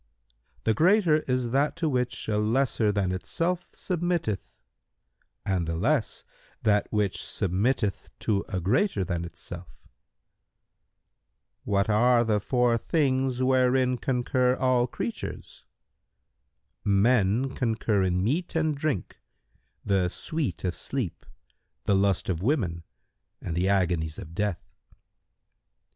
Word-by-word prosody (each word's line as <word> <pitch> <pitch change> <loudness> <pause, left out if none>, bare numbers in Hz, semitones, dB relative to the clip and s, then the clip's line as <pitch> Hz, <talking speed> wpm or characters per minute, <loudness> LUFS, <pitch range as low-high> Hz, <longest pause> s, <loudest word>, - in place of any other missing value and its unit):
"— - - -38
"The 110 - +2
greater 170 - +4
is 125 -2 0
that 140 +3 +1
to 165 -1 -1
which 125 -4 -1
a 105 -1 +1
lesser 110 0 +1
than 100 -3 0
itself 170 - -2
submitteth 175 - -2 0.9
and 95 -4 0
the 80 - -2
less 85 - 0 0.4
that 105 -1 +2
which 105 -3 0
submitteth 100 +3 -1
to 100 -3 +1
a 95 - -2
greater 105 - +1
than 85 -1 -2
itself." 85 - -8 2.0
Q - - -3
"What 100 +2 +3
are 120 +3 +4
the 110 -2 +1
four 120 +1 +2
things 130 -3 +1
wherein 130 -1 +3
concur 125 0 +1
all 130 -2 +2
creatures?"—"Men 105 - -3
concur 110 -5 0
in 90 -1 +1
meat 165 - -1
and 155 -2 +1
drink, 140 - -2 0.7
the 95 -3 +2
sweet 145 - -3
of 90 -2 0
sleep, 125 - -3 0.6
the - - +2
lust 95 -1 +1
of 90 -3 -1
women 95 - 0 0.6
and 80 - -5
the 90 +3 +1
agonies 85 -5 +1
of 85 -5 -9
death." 100 -8 -2
110 Hz, 120 wpm, -27 LUFS, 95-130 Hz, 2.0 s, greater